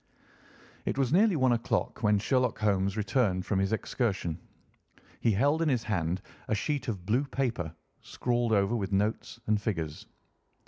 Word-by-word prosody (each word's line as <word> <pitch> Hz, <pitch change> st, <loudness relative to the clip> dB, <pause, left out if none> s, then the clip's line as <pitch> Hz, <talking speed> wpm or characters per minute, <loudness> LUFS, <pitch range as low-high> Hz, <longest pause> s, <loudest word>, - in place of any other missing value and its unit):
It -, -, -1 dB
was 135 Hz, 0 st, +1 dB
nearly 200 Hz, +1 st, +5 dB
one 130 Hz, -4 st, +3 dB
o'clock 120 Hz, -1 st, -1 dB
when 105 Hz, -2 st, +4 dB
Sherlock 125 Hz, +4 st, +1 dB
Holmes 100 Hz, -1 st, +1 dB
returned 105 Hz, -4 st, +1 dB
from 100 Hz, -2 st, 0 dB
his 95 Hz, 0 st, +1 dB
excursion. 100 Hz, -7 st, -1 dB, 0.8 s
He 115 Hz, -, +2 dB
held 145 Hz, +10 st, +2 dB
in 165 Hz, -, +2 dB
his 125 Hz, -5 st, +1 dB
hand 90 Hz, -3 st, -1 dB, 0.2 s
a 110 Hz, -, +1 dB
sheet 140 Hz, +4 st, -2 dB
of 100 Hz, -6 st, -4 dB
blue 120 Hz, +8 st, +2 dB
paper, 120 Hz, -, -2 dB, 0.3 s
scrawled 120 Hz, -1 st, -1 dB
over 100 Hz, +2 st, +3 dB
with 100 Hz, -4 st, -2 dB
notes 105 Hz, +3 st, -1 dB
and 105 Hz, -1 st, +1 dB
figures. 80 Hz, -8 st, -3 dB
110 Hz, 155 wpm, -29 LUFS, 95-125 Hz, 0.8 s, nearly